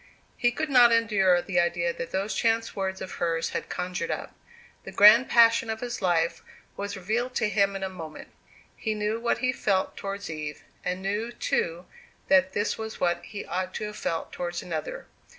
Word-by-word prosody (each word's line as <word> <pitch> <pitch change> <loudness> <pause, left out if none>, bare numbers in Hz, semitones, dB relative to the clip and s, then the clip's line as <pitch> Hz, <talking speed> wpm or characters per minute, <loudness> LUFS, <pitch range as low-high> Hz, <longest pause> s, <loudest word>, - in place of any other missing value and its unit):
He 240 - +2
could 285 +4 -3
not 245 -2 +7
endure 200 -6 +3
the 185 -3 0
idea 170 0 +1
that 170 - -6
those 195 +4 -2
chance 225 0 0
words 190 -1 -3
of 185 - -6
hers 165 -1 0
had - - -4
conjured 180 -1 -3
up. - - -4 0.5
The - - -8
grand 215 +5 +7
passion 230 -1 +5
of 220 0 -2
his 240 -1 -5
life 170 -3 +1 0.3
was 200 +1 -4
revealed 240 +7 -2
to 215 - +2
him 200 -1 +2
in 195 - -4
a - - 0
moment. 165 -5 -9 0.5
He 220 -2 -2
knew 210 +1 -1
what 235 0 0
he 255 - +3
felt 195 -5 0
towards 200 0 -5
Eve, 155 -2 -6 0.2
and 185 +1 -3
knew, 210 +4 -2
too, 175 -6 -1 0.4
that 190 0 +4
this 205 +2 -1
was 220 0 -6
what 175 -1 0
he 205 - -7
ought 185 +1 -3
to - - -3
have 210 0 -6
felt 165 -1 -3
towards 175 -1 -4
another. 160 -3 -5
195 Hz, 190 wpm, -27 LUFS, 175-220 Hz, 0.5 s, not